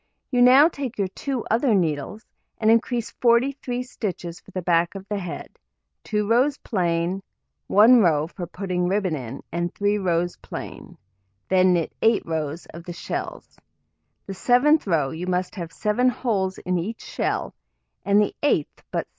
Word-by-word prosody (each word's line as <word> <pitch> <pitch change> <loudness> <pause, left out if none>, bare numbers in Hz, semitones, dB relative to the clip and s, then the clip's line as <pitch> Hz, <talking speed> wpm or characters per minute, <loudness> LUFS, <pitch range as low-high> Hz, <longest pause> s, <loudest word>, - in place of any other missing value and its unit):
You 245 -2 +2
now 260 +5 +8
take 275 -7 -5
your 195 -2 0
two 260 +4 -4
other 230 0 +3
needles, 165 +4 -1 0.3
and 220 0 +3
increase 235 0 +1
43 250 +1 +1
stitches 180 -8 -5
for 200 - -20
the 185 -2 -5
back 170 +2 +2
of 195 0 -8
the 205 -1 -2
head; 180 -3 -7 0.5
2 210 -1 -1
rows 260 +6 +3
plain, 175 -2 -1 0.5
1 230 +5 +7
row 155 -7 +3
for 175 +1 -7
putting 180 0 -2
ribbon 190 -3 0
in, 130 -2 -7
and 175 +1 -2
3 205 +1 +1
rows 175 -2 0
plain, - - -9 0.5
then 185 -1 +4
knit 170 -2 -1
8 225 -1 +3
rows 160 0 -3
of 170 +1 -9
the 175 - -7
shells; - - -6 0.7
the 195 - -6
7th 250 - +3
row 155 -7 +1
you 170 +3 -5
must 180 0 -1
have 170 -5 -6
7 220 +7 +1
holes 195 -7 -1
in 180 -1 -1
each 215 +7 -5
shell, - - -2 0.5
and 200 +1 +4
the 210 - +1
8th 225 - 0
but - - -1
6. - - -39
195 Hz, 165 wpm, -24 LUFS, 175-235 Hz, 0.7 s, now